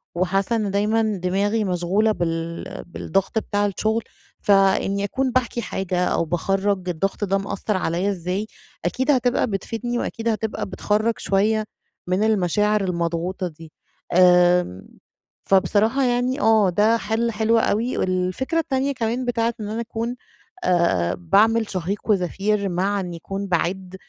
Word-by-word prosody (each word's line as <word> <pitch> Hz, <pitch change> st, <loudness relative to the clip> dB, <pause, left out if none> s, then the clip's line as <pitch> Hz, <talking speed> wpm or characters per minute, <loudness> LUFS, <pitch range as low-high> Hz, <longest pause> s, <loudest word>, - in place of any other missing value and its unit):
وحاسة 195 Hz, +5 st, +1 dB
إن 210 Hz, -3 st, -1 dB
دايمًا 210 Hz, +3 st, +1 dB, 0.2 s
دماغي 200 Hz, +4 st, +1 dB
مشغولة 190 Hz, +3 st, +1 dB
بال 165 Hz, -3 st, -4 dB
بالضغط 195 Hz, +4 st, -1 dB
بتاع 205 Hz, -1 st, -1 dB
الشغل، 220 Hz, +3 st, 0 dB, 0.4 s
فإني 195 Hz, 0 st, +3 dB
أكون 260 Hz, +5 st, -1 dB
باحكي 240 Hz, -1 st, 0 dB
حاجة 185 Hz, -4 st, -1 dB
أو 170 Hz, -, 0 dB
باخرَّج 190 Hz, +3 st, -1 dB
الضغط 190 Hz, +4 st, -2 dB
ده 195 Hz, 0 st, +1 dB
مأثر 195 Hz, +1 st, -2 dB
عليَّ 180 Hz, +2 st, 0 dB
إزاي، 190 Hz, +2 st, -2 dB, 0.4 s
أكيد 260 Hz, -, +1 dB
هتبقى 250 Hz, -2 st, +2 dB
بتفيدني 230 Hz, +4 st, -3 dB
وأكيد 230 Hz, -1 st, -3 dB
هتبقى 220 Hz, -1 st, -2 dB
بتخرَّج 210 Hz, +3 st, 0 dB
شوية 215 Hz, +3 st, +1 dB, 0.4 s
من 185 Hz, +3 st, +1 dB
المشاعر 210 Hz, 0 st, +2 dB
المضغوطة 175 Hz, +1 st, -2 dB
دي. 160 Hz, -1 st, -12 dB, 0.4 s
آمم، 180 Hz, -, +4 dB, 0.6 s
فبصراحة 215 Hz, +7 st, +3 dB
يعني 250 Hz, +2 st, +1 dB
آه 220 Hz, -3 st, +4 dB
ده 210 Hz, +5 st, +3 dB
حل 225 Hz, +2 st, -1 dB
حلو 225 Hz, +1 st, +2 dB
أوي، 225 Hz, +3 st, 0 dB
والفكرة 185 Hz, -, 0 dB
التانية 275 Hz, -2 st, 0 dB
كمان 245 Hz, 0 st, -2 dB
بتاعة 235 Hz, -1 st, 0 dB
إن 210 Hz, -, -4 dB
أنا 225 Hz, +2 st, -3 dB
أكون 230 Hz, +1 st, -4 dB, 0.5 s
آآ 95 Hz, -, +2 dB
باعمل 215 Hz, +6 st, +3 dB
شهيق 185 Hz, +2 st, -2 dB
وزفير 200 Hz, +2 st, 0 dB
مع 195 Hz, +3 st, 0 dB
إن 180 Hz, -2 st, -5 dB
يكون 195 Hz, +4 st, -5 dB
باعِدّ، 185 Hz, +1 st, -1 dB
200 Hz, 135 wpm, -22 LUFS, 180-225 Hz, 0.6 s, آمم